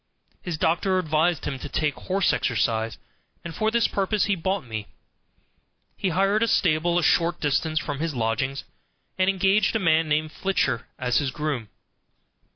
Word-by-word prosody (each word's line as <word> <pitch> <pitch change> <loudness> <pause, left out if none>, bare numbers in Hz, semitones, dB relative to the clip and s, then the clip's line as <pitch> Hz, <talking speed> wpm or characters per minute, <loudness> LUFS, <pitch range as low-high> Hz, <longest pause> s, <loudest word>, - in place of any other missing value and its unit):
His 175 -3 -4
doctor 175 +5 +1
advised 160 -1 +1
him 135 -3 -3
to - - -7
take 150 -2 0
horse 190 +1 0
exercise, 115 -1 0 0.5
and 170 - -5
for 215 +4 0
this 235 0 +2
purpose 200 +1 0
he 200 - +1
bought 190 -1 -2
me. 110 -3 -5 1.1
He 190 - -1
hired 195 +4 +2
a 230 - +3
stable 170 -3 +2
a 175 - +1
short 170 +1 +2
distance 155 +2 0
from 145 -3 -2
his 160 -2 -2
lodgings, 130 +4 -1 0.6
and 185 0 +3
engaged 195 +3 +2
a - - +2
man 165 -3 +2
named 155 +1 0
Filcher 170 -12 -1
as 125 0 +1
groom. 140 -6 -3
160 Hz, 160 wpm, -25 LUFS, 140-190 Hz, 1.1 s, a